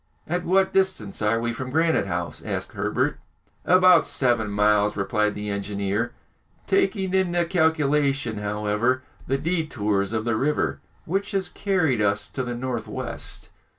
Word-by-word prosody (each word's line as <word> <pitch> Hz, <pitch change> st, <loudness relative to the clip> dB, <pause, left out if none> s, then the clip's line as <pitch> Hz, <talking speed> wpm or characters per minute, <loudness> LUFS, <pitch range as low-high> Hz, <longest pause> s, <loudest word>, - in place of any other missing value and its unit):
"At 175 Hz, +2 st, -2 dB
what 190 Hz, +2 st, +2 dB
distance 190 Hz, -, 0 dB
are 110 Hz, +2 st, +2 dB
we 120 Hz, 0 st, -1 dB
from 130 Hz, +2 st, -5 dB
Granite 160 Hz, -7 st, +2 dB
House?" 90 Hz, -2 st, -3 dB
asked -, -, -4 dB
Herbert. -, -, -1 dB, 0.5 s
"About 185 Hz, -1 st, +6 dB
seven 120 Hz, -5 st, +1 dB
miles," 105 Hz, 0 st, +2 dB
replied 105 Hz, +1 st, 0 dB
the 105 Hz, 0 st, -4 dB
engineer, 100 Hz, +3 st, -2 dB, 0.5 s
"taking 195 Hz, -1 st, +1 dB
into 175 Hz, -2 st, +2 dB
calculation, 145 Hz, -, +1 dB
however, 105 Hz, +5 st, 0 dB, 0.2 s
the 135 Hz, -, +1 dB
détours 130 Hz, -, -1 dB
of 110 Hz, -1 st, -2 dB
the 115 Hz, -2 st, +1 dB
river, 145 Hz, +7 st, 0 dB, 0.3 s
which 195 Hz, +5 st, -2 dB
has 190 Hz, -2 st, 0 dB
carried 170 Hz, -, +1 dB
us 100 Hz, -1 st, +1 dB
to 130 Hz, -, -3 dB
the 120 Hz, -1 st, -3 dB
north 120 Hz, -2 st, -3 dB
west." -, -, -5 dB
130 Hz, 145 wpm, -24 LUFS, 105-170 Hz, 0.5 s, About